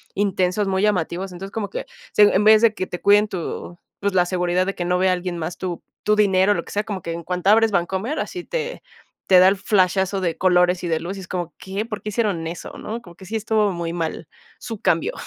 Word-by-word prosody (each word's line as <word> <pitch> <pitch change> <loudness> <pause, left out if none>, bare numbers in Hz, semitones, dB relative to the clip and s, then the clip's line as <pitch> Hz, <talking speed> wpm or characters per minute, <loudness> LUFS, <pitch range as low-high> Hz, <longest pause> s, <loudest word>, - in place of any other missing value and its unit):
intensos, 195 0 +1
muy 190 0 0
llamativos, 185 -2 0
entonces, 195 +2 -8
como 205 -2 -3
que - - -5 0.3
se 210 - +6
en 205 0 +4
vez 215 +1 +7
de 230 -2 +5
que 185 -4 -4
te 180 - -6
cuiden 205 +1 +5
tu, 175 -1 -5 0.2
pues, 200 -1 0
la 180 -1 +4
seguridad 180 0 0
de 195 - -3
que 175 - -3
no 180 +1 +1
vea 185 0 +3
alguien 180 -1 -3
más 165 +2 -4
tu 180 -3 -4 0.2
tu 210 - +3
dinero, 195 -1 +4
lo - - -3
que - - -11
sea, 210 - 0
como 205 -3 -5
que 165 - -5
en 170 0 -6
cuanto 180 +2 -1
abres 225 +1 +5
Bancomer, 190 - -1
así 360 -2 -4
te - - -4 0.5
te 185 -1 +7
da 185 - +7
el 195 - +4
flashazo 190 0 +1
de 170 -3 -1
colores 180 -1 +3
y 175 - -2
de 160 -1 +1
luces 185 +2 -6
como, 175 -2 -4
¿qué?, 195 +3 -4
¿por 215 -2 -6
qué 210 - -5
hicieron 200 -6 -1
eso?, 170 +2 -7
¿no?, 230 +2 -6
como 175 -6 -15
que 190 - -15
sí 215 +5 -5
estuvo 215 -1 +1
muy 170 -2 -4
mal 165 -2 -4 0.3
su 225 -4 -7
cambio. 165 - +1
190 Hz, 240 wpm, -22 LUFS, 180-210 Hz, 0.5 s, vez